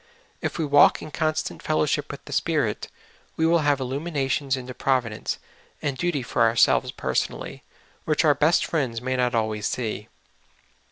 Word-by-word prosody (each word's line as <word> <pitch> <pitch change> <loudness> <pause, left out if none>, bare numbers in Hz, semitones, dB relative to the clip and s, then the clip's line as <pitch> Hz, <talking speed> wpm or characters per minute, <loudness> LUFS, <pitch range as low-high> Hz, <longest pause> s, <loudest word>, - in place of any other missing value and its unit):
If - - -3
we 165 - 0
walk 145 0 +5
in 155 - -8
constant 155 0 -2
fellowship 155 -1 0
with - - -10
the - - -7
Spirit, - - 0 0.5
we 160 - +2
will 170 +1 +4
have 145 -2 +2
illuminations 135 0 -1
into 125 0 -7
providence 125 -5 -1 0.4
and 140 -2 -2
duty 155 -3 -1
for 120 - -2
ourselves 115 0 +4
personally, - - -3 0.4
which 155 +1 +2
our 150 - +6
best 150 +4 +3
friends 130 -8 -1
may 130 +2 -2
not 125 -1 +1
always 110 -2 0
see. 110 -3 -3
135 Hz, 155 wpm, -25 LUFS, 125-155 Hz, 0.5 s, our